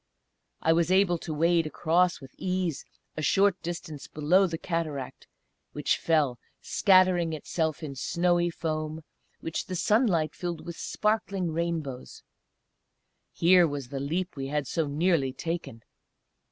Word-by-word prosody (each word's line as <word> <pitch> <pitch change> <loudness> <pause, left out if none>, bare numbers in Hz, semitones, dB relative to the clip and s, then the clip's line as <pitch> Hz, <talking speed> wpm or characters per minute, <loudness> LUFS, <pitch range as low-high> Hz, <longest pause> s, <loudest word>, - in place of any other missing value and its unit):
I 160 - +4
was 170 +1 +1
able 185 -3 +3
to 160 - -6
wade 165 +1 +2
across 175 +3 +1
with 135 -2 -13
ease 180 -5 -2 0.3
a 155 - -4
short 195 +3 +3
distance 165 -4 -6
below 175 +6 +3
the 165 -2 -4
cataract, 155 -6 -4 0.5
which - - +1
fell, 150 -7 +1 0.2
scattering 185 -4 +3
itself 160 0 -2
in 145 -3 -5
snowy 175 +5 +1
foam, 155 -1 -4 0.4
which 165 - -4
the 185 - -4
sunlight 180 - +2
filled 175 -3 -5
with 170 - -6
sparkling 200 -5 -1
rainbows. 160 -6 -4 1.1
Here 175 0 +5
was 140 -4 -5
the 140 0 -4
leap 170 +7 -2
we 135 -1 -4
had 145 0 -1
so 160 +2 -1
nearly 145 -2 +1
taken! 165 -8 -5
165 Hz, 135 wpm, -28 LUFS, 150-180 Hz, 1.1 s, Here